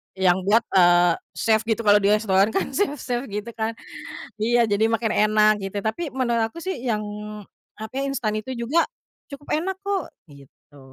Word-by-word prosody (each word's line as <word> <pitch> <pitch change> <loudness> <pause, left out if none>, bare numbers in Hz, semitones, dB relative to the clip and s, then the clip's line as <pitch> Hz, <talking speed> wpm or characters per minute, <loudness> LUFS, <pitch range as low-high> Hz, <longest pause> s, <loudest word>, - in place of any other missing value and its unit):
yang 190 -1 +3
buat, 225 +3 +4
eee, 175 -1 +5 0.2
chef 220 0 +1
gitu, 230 0 0
kalau 205 -1 +6
di 200 - +1
restoran 205 -2 +3
kan - - -1
chef 320 -1 0
chef 245 -1 -4
gitu 210 +2 -5
kan, 225 0 -3 0.6
iya, 235 +3 +3
jadi 205 +2 +3
makin 225 0 0 0.2
enak 215 0 +4
gitu, 200 0 -5
tapi 220 - -2
menurut 235 -3 +1
aku 335 +9 -10
sih 375 -4 -3
yang, 215 -3 0 0.7
tapi 255 +6 -4
instan 230 -6 -2
itu 260 +5 -6
juga 255 +8 +1 0.4
cukup 285 0 -12
enak 380 +4 -2
kok, 400 -4 -2 0.2
gitu. 140 +1 -18
220 Hz, 170 wpm, -23 LUFS, 205-255 Hz, 0.7 s, kalau